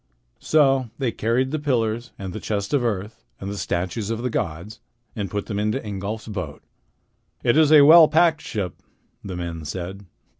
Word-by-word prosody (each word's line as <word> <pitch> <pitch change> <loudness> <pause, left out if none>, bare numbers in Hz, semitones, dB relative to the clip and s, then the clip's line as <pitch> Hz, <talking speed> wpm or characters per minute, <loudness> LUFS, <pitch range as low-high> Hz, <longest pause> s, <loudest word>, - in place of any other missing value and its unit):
So 135 -5 +3
they 130 -4 -1
carried 120 +5 0
the 155 - -1
pillars 120 -5 -1
and 95 -2 -6
the - - -5
chest 100 +3 -3
of 140 -4 +2
earth 105 -1 -3 0.2
and 100 - -5
the 100 - -5
statues 90 +5 -2
of 115 +1 -3
the 125 - -1
gods, 85 +3 -4 0.4
and 100 -3 -3
put 105 +2 -3
them 105 -2 -3
into 105 +4 0
Ingolf's 105 0 -5
boat. 90 -9 -6 0.8
"It 120 - +3
is 155 -1 +5
a 155 -2 +9
well 160 +1 +9
packed 160 0 +3
ship," 95 -7 -5 0.4
the 95 -2 -6
men 85 -2 -5
said. 95 +5 -6
110 Hz, 180 wpm, -23 LUFS, 95-130 Hz, 0.8 s, a